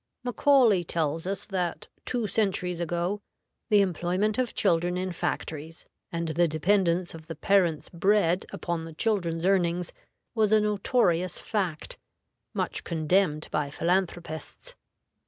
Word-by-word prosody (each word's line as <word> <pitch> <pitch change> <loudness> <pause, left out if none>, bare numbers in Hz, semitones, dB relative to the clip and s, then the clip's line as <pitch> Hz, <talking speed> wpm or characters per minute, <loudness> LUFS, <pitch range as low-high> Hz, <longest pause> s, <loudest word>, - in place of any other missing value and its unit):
Macaulay 245 - +4
tells 160 0 -1
us 195 0 -3
that, 180 -4 -3 0.2
two 240 -3 -1
centuries 185 -5 0
ago, 175 +4 -1 0.5
the 210 -2 +6
employment 190 +4 0
of 250 -3 -1
children 175 -2 +2
in 185 0 -2
factories, 160 -2 -4 0.3
and 170 -1 -2
the 170 +2 +2
dependence 175 +2 +1
of 160 -1 -11
the 165 - -6
parent's 175 -1 +2
bread 180 0 +2
upon 170 -2 -3
the 165 - -9
children's 170 -3 0
earnings, 180 -2 +1 0.4
was 215 -3 +2
a 215 - +6
notorious 200 -4 +1
fact, 185 -8 -3 0.5
much - - -2
condemned 160 -1 +1
by 150 -2 0
philanthropists. 175 - -2
180 Hz, 125 wpm, -27 LUFS, 165-200 Hz, 0.5 s, the